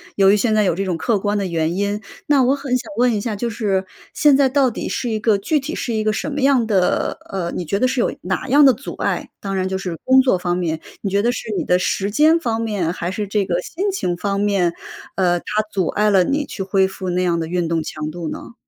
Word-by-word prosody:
由 195 Hz, -1 st, +5 dB
于 -, -, +5 dB
现 220 Hz, +1 st, +1 dB
在 215 Hz, 0 st, +3 dB
有 185 Hz, -, +1 dB
这 195 Hz, -, -1 dB
种 180 Hz, -3 st, -2 dB
客 225 Hz, +6 st, +1 dB
观 205 Hz, +1 st, 0 dB
的 200 Hz, -, -1 dB
原 165 Hz, -1 st, -1 dB
因。 205 Hz, +1 st, -1 dB, 0.2 s
那 290 Hz, -5 st, +4 dB
我 260 Hz, +3 st, +3 dB
很 275 Hz, -2 st, -2 dB
想 255 Hz, +5 st, -4 dB
问 245 Hz, 0 st, +3 dB
一 210 Hz, -, -1 dB
下， 220 Hz, 0 st, -3 dB
就 235 Hz, +4 st, -2 dB
是 205 Hz, -4 st, -1 dB, 0.3 s
现 295 Hz, -2 st, +5 dB
在 270 Hz, -1 st, +4 dB
到 270 Hz, -1 st, +3 dB
底 -, -, -5 dB
是 245 Hz, -, -2 dB
一 220 Hz, -1 st, -1 dB
个 215 Hz, -1 st, +3 dB
具 295 Hz, +10 st, 0 dB
体 290 Hz, +4 st, -5 dB
是 235 Hz, -, -3 dB
一 215 Hz, -1 st, 0 dB
个 215 Hz, -, +2 dB
什 215 Hz, -, -3 dB
么 290 Hz, 0 st, -3 dB
样 265 Hz, -3 st, +3 dB
的 195 Hz, -5 st, +1 dB
呃， 180 Hz, -3 st, -3 dB
你 -, -, -2 dB
觉 200 Hz, +5 st, -1 dB
得 255 Hz, -, +3 dB
是 255 Hz, -1 st, 0 dB
有 -, -, 0 dB
哪 190 Hz, +8 st, -2 dB
样 285 Hz, +3 st, +6 dB
的 265 Hz, -, +7 dB
阻 260 Hz, +5 st, -8 dB
碍？ -, -, -2 dB
当 195 Hz, -1 st, -4 dB
然 185 Hz, 0 st, 0 dB
就 190 Hz, -, -1 dB
是 185 Hz, -3 st, -4 dB
工 260 Hz, 0 st, +5 dB
作 255 Hz, -7 st, +2 dB
方 175 Hz, 0 st, -1 dB
面， 160 Hz, -3 st, -2 dB, 0.2 s
你 200 Hz, -, -2 dB
觉 200 Hz, +1 st, +1 dB
得 240 Hz, +3 st, +2 dB
是 245 Hz, -, -6 dB
你 -, -, 0 dB
的 180 Hz, -, +3 dB
时 195 Hz, +2 st, -1 dB
间 310 Hz, +8 st, +5 dB
方 230 Hz, -7 st, -1 dB
面 205 Hz, -7 st, -1 dB
还 175 Hz, 0 st, -4 dB
是 205 Hz, +1 st, -3 dB
这 205 Hz, 0 st, 0 dB
个 180 Hz, -1 st, -1 dB
心 390 Hz, -, -2 dB
情 180 Hz, -, -2 dB
方 200 Hz, +1 st, -1 dB
面， 195 Hz, -4 st, +1 dB, 0.4 s
呃， 175 Hz, -2 st, +2 dB
它 -, -, -21 dB, 0.3 s
阻 190 Hz, -5 st, 0 dB
碍 210 Hz, 0 st, +1 dB
了 195 Hz, -3 st, +5 dB
你 285 Hz, +10 st, 0 dB
去 195 Hz, -, -5 dB
恢 190 Hz, 0 st, +2 dB
复 190 Hz, -1 st, -6 dB
那 180 Hz, +1 st, 0 dB
样 170 Hz, -2 st, +1 dB
的 165 Hz, -, -3 dB
运 175 Hz, 0 st, -1 dB
动 165 Hz, 0 st, 0 dB
强 155 Hz, 0 st, -5 dB
度 170 Hz, 0 st, -5 dB
呢？ -, -, -8 dB
205 Hz, 290 characters per minute, -20 LUFS, 180-245 Hz, 0.4 s, 的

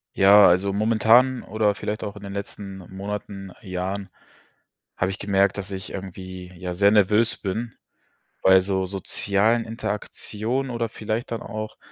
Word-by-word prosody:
Ja, 100 Hz, +1 st, +8 dB
also, 95 Hz, +3 st, +2 dB
momentan 115 Hz, +4 st, +4 dB
oder 105 Hz, 0 st, +1 dB
vielleicht 105 Hz, +1 st, -4 dB
auch 105 Hz, 0 st, -5 dB
in 105 Hz, -, -11 dB
den 100 Hz, -1 st, -7 dB
letzten 100 Hz, -1 st, -6 dB
Monaten, 100 Hz, -1 st, -6 dB
Jahren 95 Hz, +1 st, -4 dB, 0.9 s
habe 95 Hz, +1 st, 0 dB
ich 95 Hz, -, -7 dB
gemerkt, 100 Hz, -1 st, +2 dB
dass 100 Hz, -1 st, -5 dB
ich 95 Hz, -1 st, -6 dB
irgendwie, 95 Hz, -1 st, -8 dB
ja, 90 Hz, 0 st, -4 dB
sehr 100 Hz, +3 st, +4 dB
nervös 105 Hz, +2 st, +3 dB
bin, 110 Hz, +4 st, -4 dB, 0.7 s
bei 95 Hz, 0 st, +7 dB
so 95 Hz, 0 st, -1 dB
sozialen 100 Hz, +4 st, +1 dB
Interaktionen 110 Hz, +3 st, -3 dB
oder 115 Hz, -1 st, -2 dB
vielleicht 110 Hz, +2 st, -4 dB
dann 115 Hz, -, -3 dB
auch, 110 Hz, -1 st, -6 dB
100 Hz, 145 wpm, -24 LUFS, 95-110 Hz, 0.9 s, Ja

